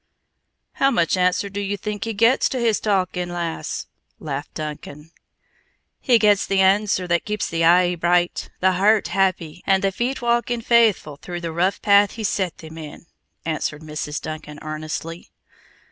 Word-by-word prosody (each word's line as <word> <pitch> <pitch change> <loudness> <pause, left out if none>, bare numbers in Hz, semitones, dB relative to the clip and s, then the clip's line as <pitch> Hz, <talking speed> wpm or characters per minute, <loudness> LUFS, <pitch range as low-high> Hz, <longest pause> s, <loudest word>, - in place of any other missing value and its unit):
"How 275 - +2
much 175 -11 +1
answer 180 +2 +1
do 200 +1 -5
ye 200 0 -2
think 210 +1 -4
he 225 - -3
gets 230 +5 +3
to 260 - -3
his 230 -3 +2
talkin', 185 -3 -1
lass?" 170 -2 -4 0.3
laughed 145 -2 -6
Duncan. 150 0 -7 0.9
"He 245 -2 +4
gets 210 -2 +3
the 195 -1 +1
answer 190 0 +3
that 170 0 +1
keeps 210 0 -2
the 165 0 -1
eye 175 +1 +5
bright, 175 +1 0
the 190 0 +4
heart 205 +4 +3
happy, 180 -3 0
and 195 0 +3
the 195 - +2
feet 240 +7 -2
walking 240 0 0
faithful 220 -11 +2
the 175 0 -5
rough 180 +4 0
path 200 0 +5
he's 220 -3 -2
set 185 -5 -2
them 160 0 -10
in," 155 +1 -10 0.4
answered 155 -1 -3
Mrs. 150 -1 -4
Duncan 155 -1 -7
earnestly. 155 +2 -6
185 Hz, 160 wpm, -22 LUFS, 165-205 Hz, 0.9 s, eye